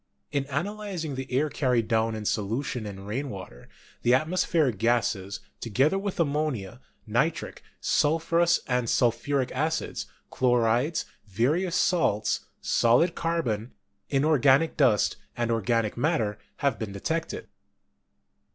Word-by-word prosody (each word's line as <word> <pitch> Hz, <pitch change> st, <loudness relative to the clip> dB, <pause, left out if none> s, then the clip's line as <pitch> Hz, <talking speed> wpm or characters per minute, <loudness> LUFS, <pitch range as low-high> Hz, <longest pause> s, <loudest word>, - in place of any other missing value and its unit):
In 140 Hz, -2 st, 0 dB
analyz 190 Hz, +5 st, -3 dB
ing 150 Hz, -, -4 dB
the 130 Hz, 0 st, -6 dB
air 135 Hz, +5 st, +2 dB
carried 125 Hz, -6 st, +1 dB
down 110 Hz, 0 st, +1 dB
in 110 Hz, -1 st, -5 dB
solution 110 Hz, +3 st, -2 dB
in 95 Hz, -1 st, -8 dB
rain 130 Hz, +7 st, -3 dB
water, 90 Hz, -, -9 dB, 0.3 s
the 120 Hz, +1 st, +4 dB
atmospheric 155 Hz, -, +1 dB
gases, 110 Hz, -4 st, 0 dB, 0.2 s
together 135 Hz, -, +1 dB
with 200 Hz, -2 st, -4 dB
ammonia, 145 Hz, -, -1 dB, 0.2 s
nitric, -, -, -1 dB, 0.2 s
sul 150 Hz, +2 st, +2 dB
phurous 170 Hz, +1 st, +3 dB
and 125 Hz, -3 st, 0 dB
sulphuric 130 Hz, +2 st, +1 dB
acids, 155 Hz, +4 st, -2 dB, 0.2 s
chlorides, 125 Hz, +4 st, +2 dB, 0.2 s
various 150 Hz, -, +1 dB
salts, 165 Hz, -, +1 dB
solid 125 Hz, +9 st, +3 dB
carbon, 130 Hz, -10 st, -2 dB, 0.4 s
inorganic 145 Hz, +1 st, +3 dB
dust, 120 Hz, -8 st, +3 dB, 0.2 s
and 120 Hz, -1 st, 0 dB
organic 115 Hz, 0 st, +1 dB
matter, 120 Hz, -7 st, 0 dB, 0.2 s
have 140 Hz, -5 st, 0 dB
been 110 Hz, -3 st, -4 dB
detected. 160 Hz, +12 st, -3 dB
130 Hz, 120 wpm, -27 LUFS, 115-155 Hz, 0.4 s, the